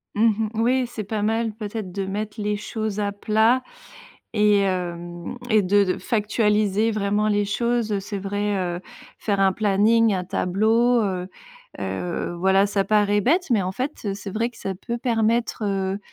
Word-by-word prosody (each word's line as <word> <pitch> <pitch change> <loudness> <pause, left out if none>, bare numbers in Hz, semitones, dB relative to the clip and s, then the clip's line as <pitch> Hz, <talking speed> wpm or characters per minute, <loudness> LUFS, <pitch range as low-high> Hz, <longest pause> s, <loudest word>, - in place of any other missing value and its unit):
Mmh 215 - +2
mh, 220 -1 +2
oui, 245 +2 +2
c'est 235 -3 -6
pas 210 +1 -3
mal 225 +1 0
peut-être 210 -2 -5
de 195 +1 -3
mettre 210 +2 -4
les 210 0 -1
choses 215 0 -4
à 205 -1 0
plat 220 +5 +2 0.7
et 210 -1 +4
hem, 175 0 -3
et 215 -1 +5
de 200 +2 +3
de 185 - -1
factualiser 210 -1 +1
vraiment 210 0 0
les 205 -1 +2
choses, 235 +1 0
heu, 200 - 0
c'est 200 +1 -5
vrai, 205 +1 -1
heu, 175 -1 -2 0.4
faire 200 -2 -1
un 195 -1 +4
planning, 215 +2 +3
un 180 -1 -2
tableau, 220 +6 +2
heu 185 -3 -2 0.5
heu, 175 0 -3
voilà, 190 +2 +4
ça 200 -1 0
paraît 205 0 +3
bête, 330 - +1
mais 220 -4 +4
en 185 - -2
fait 260 +9 -2 0.2
c'est 200 0 -7
vrai 230 +4 0
que 240 - -18
ça 195 -1 -4
peut 235 +6 -5
permettre, 230 -1 0
heu 195 -1 -1
210 Hz, 175 wpm, -23 LUFS, 195-225 Hz, 0.7 s, et